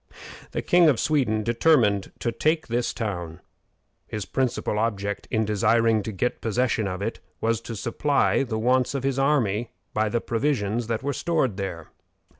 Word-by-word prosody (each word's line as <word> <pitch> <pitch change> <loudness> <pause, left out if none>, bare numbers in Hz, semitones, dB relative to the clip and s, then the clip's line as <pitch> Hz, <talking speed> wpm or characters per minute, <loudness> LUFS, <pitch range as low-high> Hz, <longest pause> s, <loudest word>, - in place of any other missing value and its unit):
The - - -3
King 175 -2 +5
of 130 -7 +2
Sweden 125 -9 +1
determined 115 -4 +3
to 115 - 0
take 155 +6 +1
this 120 +1 0
town. 85 -8 -4 0.7
His 105 -3 -4
principal 125 -4 -1
object 100 -3 -2
in 110 0 +1
desiring 110 +2 +3
to 110 - -5
get 115 +5 -2
possession 115 -1 0
of 95 +1 -4
it 115 - -3 0.2
was 115 0 0
to 115 0 -6
supply 140 +6 +1
the 120 -5 -2
wants 125 +3 +2
of 135 - -2
his 135 0 0
army 120 -6 +1 0.2
by 110 0 +1
the 120 - 0
provisions 115 -3 -1
that 115 +1 -2
were 140 +1 -1
stored 135 - 0
there. 90 -5 -5
115 Hz, 165 wpm, -25 LUFS, 105-130 Hz, 0.7 s, King